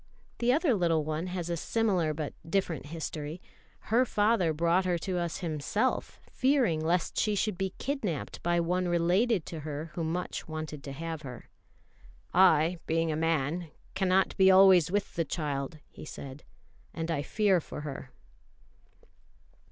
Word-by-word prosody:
The 240 +1 +3
other 300 0 +3
little 165 -6 +1
one 155 +3 -2
has 180 -2 -4
a 170 - -1
similar 185 -3 +1
but 150 -1 -4 0.2
different 170 -6 -1
history. 155 0 -5 0.5
Her 245 +2 +6
father 210 -7 +2
brought 170 +4 +2
her 180 -1 +1
to 180 +1 -2
us 170 +2 -3
himself, 165 - -1
fearing 255 - +2
lest 170 +1 0
she 210 -1 +1
should 205 0 0
be 190 +1 -3
kidnapped 225 - -3
by 175 0 +1
one 180 +2 0
related 175 +4 +2
to 165 - -6
her 155 +1 -6
who 170 - -3
much 170 +3 -3
wanted 155 -2 -6
to 140 - -6
have 160 +2 -5
her. 125 -5 -9 0.8
"I, 175 -2 +5
being 165 0 +1
a - - -1
man, 165 +1 0 0.2
cannot 190 0 +2
be 190 0 +6
always 190 -3 +7
with 205 +2 -1
the 165 - 0
child," 145 -2 -3
he - - -12
said, 140 -2 -9 0.5
"and 165 0 -2
I 145 -3 0
fear 195 +2 +2
for 150 - -8
her." 140 -2 -7
170 Hz, 155 wpm, -29 LUFS, 155-190 Hz, 0.8 s, always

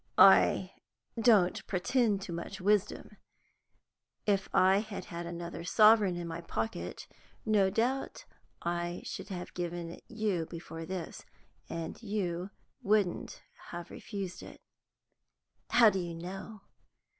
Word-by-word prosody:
"I - - +6 0.4
don't 215 -6 +4
pretend 205 +1 +1
to 175 - -6
much 170 +4 -6
wisdom. 205 +1 0 1.1
If 200 -2 +1
I 190 +1 +5
had 215 -1 -6
had 170 -2 -6
another 170 0 -6
sovereign 210 0 +5
in 175 -1 -4
my 165 +1 -5
pocket, 110 - -4 0.4
no 205 -3 +4
doubt 240 +7 -1 0.4
I 175 0 -2
should - - -6
have 180 -2 -6
given 175 -1 -4
it - - -12
you 210 -8 -1
before 165 -1 -8
this, 185 -3 -5 0.5
and 165 +5 -5
you 190 -4 -2 0.3
wouldn't 200 -3 0 0.3
have 175 0 -7
refused 195 -4 -6
it." - - -11 1.1
"How 235 -3 +7
do 190 - -1
you 170 -2 -4
know?" 195 +5 -7
185 Hz, 120 wpm, -31 LUFS, 170-210 Hz, 1.1 s, How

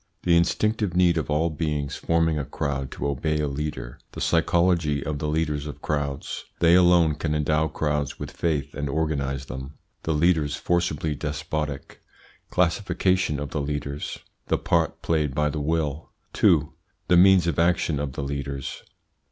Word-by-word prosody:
The 85 -1 +4
instinctive 105 +3 +1
need 90 -2 +4
of 75 - -4
all 80 +2 +1
beings 75 -3 -2
forming 80 -2 +1
a - - -1
crowd 70 0 -3
to - - -3
obey 75 +3 -1
a 75 - 0
leader 70 -4 -5
The - - -7
psychology 85 -3 +2
of 75 -2 -3
the 75 - -2
leaders 75 -1 -1
of 75 - -9
crowds 70 -2 -3
They 85 0 +5
alone 90 -3 +5
can 75 +1 -2
endow 75 +1 +1
crowds 75 -2 -2
with - - -6
faith 75 -5 -1
and 70 0 -3
organise 70 -3 -1
them 65 +2 -7 0.3
The 80 - -1
leaders 75 -2 +2
forcibly 80 -3 0
despotic 75 0 -4 0.5
Classification 90 -3 +1
of 70 -1 -5
the 75 - -1
leaders 70 0 -4 0.3
The - - +2
part - - 0
played 75 -4 0
by 75 0 +2
the 75 - -3
will. 80 0 -1 0.2
2. 75 -3 +3 0.3
THE 90 0 +5
MEANS 95 -1 +6
OF 85 -3 0
ACTION 85 -3 +2
OF 70 -2 -3
THE 70 - -4
LEADERS. 70 -1 -4
75 Hz, 160 wpm, -25 LUFS, 70-85 Hz, 0.5 s, MEANS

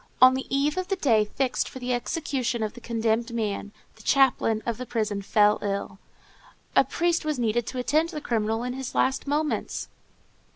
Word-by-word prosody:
On 255 0 +8
the 265 0 -3
eve 285 +4 +1
of 370 0 -1
the 390 - 0
day 230 - +3
fixed 255 +4 -1
for - - -9
the 250 0 -2
execution 250 -2 -1
of 215 - -3
the 240 - -12
condemned 230 0 0
man, 210 -3 -2 0.3
the - - -14
chaplain 245 -4 +3
of 235 -1 -2
the 255 - -4
prison 215 -4 -1
fell 210 +1 +3
ill. 195 -1 -3 0.8
A - - +7
priest 335 +6 0
was 305 -2 -1
needed 235 0 0
to 255 - -5
attend 305 +6 +1
the 315 -3 -5
criminal 225 -3 -1
in 250 0 -3
his 265 -1 -6
last 265 +2 +1
moments. 300 +2 -1
245 Hz, 190 wpm, -26 LUFS, 220-275 Hz, 0.8 s, On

